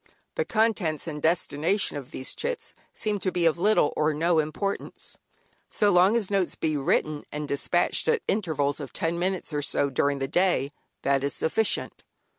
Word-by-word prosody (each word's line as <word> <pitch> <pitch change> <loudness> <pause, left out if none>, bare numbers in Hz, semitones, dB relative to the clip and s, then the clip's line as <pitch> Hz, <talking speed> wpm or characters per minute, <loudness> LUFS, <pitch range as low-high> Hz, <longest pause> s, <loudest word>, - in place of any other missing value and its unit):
The 485 - -1
contents 210 - +1
and 150 -3 -5
destination 165 +4 +1
of 140 -3 -6
these 130 - -5
"chits" 485 0 -3 0.2
seem 210 -2 -2
to 185 0 -1
be 175 -2 0
of 165 0 +3
little 205 -5 +3
or 150 0 +1
no 165 +1 +2
importance; 155 +6 -3 0.5
so 205 -1 +2
long 185 +4 +5
as 210 -4 -1
notes 195 -3 +1
be 155 -1 -1
written 145 +1 0
and 150 0 -4
despatched 140 - +1
at 470 -1 +2
intervals 155 -9 0
of 140 -3 -7
ten 165 +1 -1
minutes 185 -2 -1
or 145 - 0
so 140 0 +1
during 140 +2 +1
the 135 0 -2
day, 175 -3 +1 0.3
that 140 0 +2
is 140 - 0
sufficient. 220 +7 0
165 Hz, 175 wpm, -26 LUFS, 145-195 Hz, 0.5 s, long